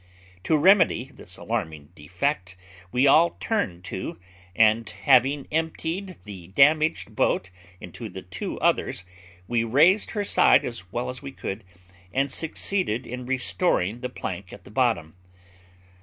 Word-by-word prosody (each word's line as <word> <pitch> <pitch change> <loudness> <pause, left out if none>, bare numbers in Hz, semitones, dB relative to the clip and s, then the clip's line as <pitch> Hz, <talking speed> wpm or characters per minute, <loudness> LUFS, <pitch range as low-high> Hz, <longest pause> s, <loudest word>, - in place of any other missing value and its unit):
To 155 - +3
remedy 165 - +4
this 90 - -13
alarming 80 -10 -4
defect 90 - -3 0.3
we 125 +2 +2
all 160 +4 +5
turned 90 - -2
to, 85 - -6 0.4
and 110 +1 +3
having 135 +2 +2
emptied 165 +4 -3
the 95 -5 -10
damaged 155 - +3
boat 90 - 0 0.3
into - - -8
the - - -9
two - - -6
others, - - +1 0.4
we 120 -1 +1
raised 155 - +4
her 205 - +1
side - - +4
as 95 -7 -6
well 120 +1 -3
as 125 - -6
we 140 -1 -7
could, 105 -4 -6 0.5
and 135 +4 0
succeeded 165 - -1
in 125 +1 -7
restoring 100 -2 0
the 125 - -3
plank 95 -5 -6
at - - -12
the - - -15
bottom. 110 -10 0
125 Hz, 140 wpm, -25 LUFS, 95-155 Hz, 0.5 s, all